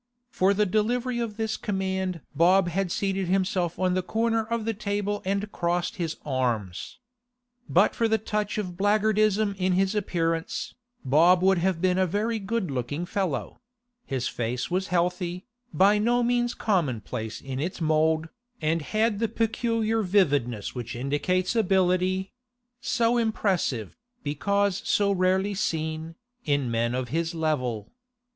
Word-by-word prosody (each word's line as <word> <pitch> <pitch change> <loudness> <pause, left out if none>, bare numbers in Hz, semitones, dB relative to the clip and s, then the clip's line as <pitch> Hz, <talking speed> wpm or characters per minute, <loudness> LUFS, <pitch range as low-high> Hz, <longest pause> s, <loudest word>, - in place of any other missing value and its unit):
For 195 -2 +2
the 210 +1 +3
delivery 240 +5 0
of 225 -3 -3
this 220 -1 -1
command 190 -4 -2
Bob 175 +4 +4
had 185 +1 -1
seated 195 -1 -1
himself 185 -2 0
on 185 -1 +1
the 185 - +1
corner 225 +3 0
of 230 0 -2
the 225 - 0
table 205 0 -2
and 200 +2 -1
crossed 175 0 -1
his 165 -3 -3
arms. 120 -10 -2 0.7
But 190 +5 +4
for 230 - +1
the 220 0 +2
touch 210 -1 -2
of 185 -4 -3
black 205 +2 +2
guardism 215 -1 +2
in 185 0 +2
his 190 +2 +2
appearance, 165 -5 -1 0.3
Bob 170 +7 +5
would 190 -1 +4
have 180 -1 0
been 185 0 +3
a 185 - +3
very 215 +5 -1
good 200 -4 -2
looking 135 +6 -3
fellow; 180 -5 -3 0.4
his 130 - -2
face 120 +5 -3
was 185 +1 0
healthy, 180 0 -1 0.3
by 200 +3 +4
no 240 +3 +2
means 240 0 +1
commonplace 125 - -1
in 135 -1 -5
its 170 +6 -3
mould, 160 0 +2 0.3
and 160 +1 0
had 215 +5 0
the 230 - +1
peculiar 225 0 0
vividness 145 - +1
which 120 -2 -5
indicates 150 - 0
ability—so 230 +5 0
impressive, 190 - 0 0.3
because 200 +6 0
so 200 -1 +2
rarely 190 +1 +2
seen, 160 -4 -2 0.3
in 140 -4 0
men 115 +1 0
of 130 -1 -3
his 165 +4 -1
level. 130 -9 -1
185 Hz, 145 wpm, -26 LUFS, 160-210 Hz, 0.7 s, Bob